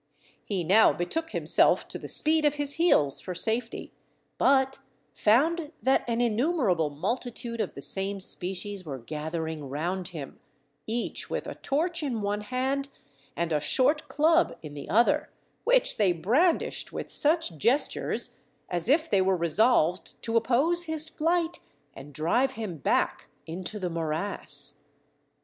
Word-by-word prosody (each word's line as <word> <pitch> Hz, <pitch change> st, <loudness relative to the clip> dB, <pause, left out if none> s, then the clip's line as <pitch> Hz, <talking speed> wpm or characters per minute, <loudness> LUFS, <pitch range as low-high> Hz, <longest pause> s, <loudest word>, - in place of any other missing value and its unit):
He 190 Hz, -4 st, -2 dB
now 200 Hz, +7 st, +6 dB
betook 320 Hz, -, -3 dB
himself -, -, +2 dB
to -, -, -6 dB
the -, -, -8 dB
speed 315 Hz, 0 st, +2 dB
of 295 Hz, -1 st, +3 dB
his 290 Hz, -1 st, +2 dB
heels 145 Hz, -, +3 dB
for 180 Hz, -, -6 dB
safety, 225 Hz, +5 st, -1 dB, 0.5 s
but 265 Hz, 0 st, +3 dB, 0.3 s
found 305 Hz, +8 st, +2 dB
that 265 Hz, +1 st, +3 dB
an 235 Hz, 0 st, 0 dB
innumerable 235 Hz, -, +1 dB
multitude 230 Hz, -, -3 dB
of -, -, -4 dB
the -, -, -6 dB
same 195 Hz, +1 st, 0 dB
species 190 Hz, +1 st, -4 dB
were 145 Hz, -5 st, -6 dB
gathering 155 Hz, +2 st, -5 dB
round 175 Hz, +6 st, -2 dB
him, 155 Hz, -6 st, -8 dB, 0.5 s
each 230 Hz, +2 st, -3 dB
with -, -, -3 dB
a -, -, -5 dB
torch 335 Hz, +5 st, -1 dB
in 245 Hz, -8 st, -2 dB
one 205 Hz, +1 st, -1 dB
hand 265 Hz, +5 st, -2 dB, 0.5 s
and 170 Hz, -1 st, -2 dB
a 150 Hz, -1 st, +1 dB
short 280 Hz, -, +3 dB
club 320 Hz, +3 st, +2 dB
in 150 Hz, -2 st, -8 dB
the 145 Hz, -1 st, -8 dB
other, 240 Hz, +8 st, +3 dB, 0.4 s
which -, -, +3 dB
they 200 Hz, -4 st, +3 dB
brandished 255 Hz, -, +1 dB
with -, -, -6 dB
such 310 Hz, -, +1 dB
gestures, 245 Hz, -, 0 dB, 0.4 s
as 175 Hz, +4 st, -2 dB
if 315 Hz, +4 st, +3 dB
they 200 Hz, -8 st, +3 dB
were 190 Hz, 0 st, +2 dB
resolved 175 Hz, +1 st, +2 dB
to 230 Hz, -, -2 dB
oppose 275 Hz, +10 st, +2 dB
his 315 Hz, -1 st, -2 dB
flight, 335 Hz, +2 st, 0 dB, 0.3 s
and 140 Hz, +2 st, -11 dB
drive 205 Hz, -, +1 dB
him 215 Hz, -8 st, -5 dB
back 135 Hz, -, 0 dB, 0.2 s
into 180 Hz, +6 st, -5 dB
the 185 Hz, -3 st, -3 dB
morass. 165 Hz, +4 st, -2 dB
225 Hz, 145 wpm, -27 LUFS, 175-290 Hz, 0.5 s, now